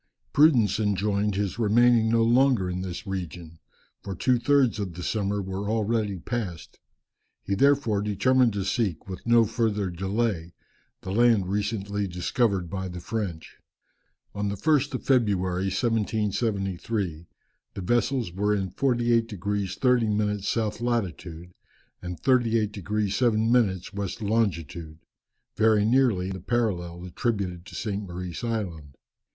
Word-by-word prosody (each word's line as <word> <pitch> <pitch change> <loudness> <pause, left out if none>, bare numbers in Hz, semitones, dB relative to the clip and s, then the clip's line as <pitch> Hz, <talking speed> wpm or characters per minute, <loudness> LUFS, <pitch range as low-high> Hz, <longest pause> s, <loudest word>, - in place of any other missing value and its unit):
Prudence 120 - +4
enjoined 105 0 0
his 100 +2 -2
remaining 115 +1 +4
no 115 0 +3
longer 120 -3 +3
in 90 0 -3
this 95 +4 -6
region, 85 -4 -6 0.4
for 100 -1 -6
two 125 +6 +2
thirds 135 -4 +3
of 95 -5 -4
the 90 - -6
summer 100 -1 -1
were 95 +2 -4
already 110 -2 0
passed. 95 -3 -5 0.6
He 100 - -2
therefore 135 -3 +3
determined 120 +4 +2
to 100 -2 -2
seek, 100 -5 -1
with 95 +4 -8
no 115 -1 +5
further 105 -4 -1
delay, 95 -1 -2 0.5
the 95 - -6
land 110 -4 +3
recently 100 -1 -2
discovered 90 +2 0
by 95 +2 -4
the 90 -1 -7
French. 90 -4 -5 0.8
On 105 0 -2
the 100 - -2
1st 145 +3 +1
of - - -5
February, 95 -8 +1
1773, 100 -5 -1 0.5
the - - -5
vessels 120 +1 0
were 105 +3 +1
in 95 -3 -2
48 120 -1 +1
degrees 100 -2 -3
30 125 -3 +2
minutes 105 -1 0
south 110 -1 -1
latitude, 90 -7 -3 0.5
and 90 -1 -6
38 115 -5 +2
degrees 105 0 -2
7 115 -1 +2
minutes 100 -5 +1
west 100 -2 -4
longitude, 85 -8 -2 0.6
very 110 -1 +3
nearly 110 -6 +2
the 95 -2 -6
parallel 90 -6 -2
attributed 90 -3 -3
to - - -10
St. 105 -2 -3
Maurice 90 +3 -6
Island. 90 - -4
105 Hz, 135 wpm, -26 LUFS, 95-115 Hz, 0.8 s, no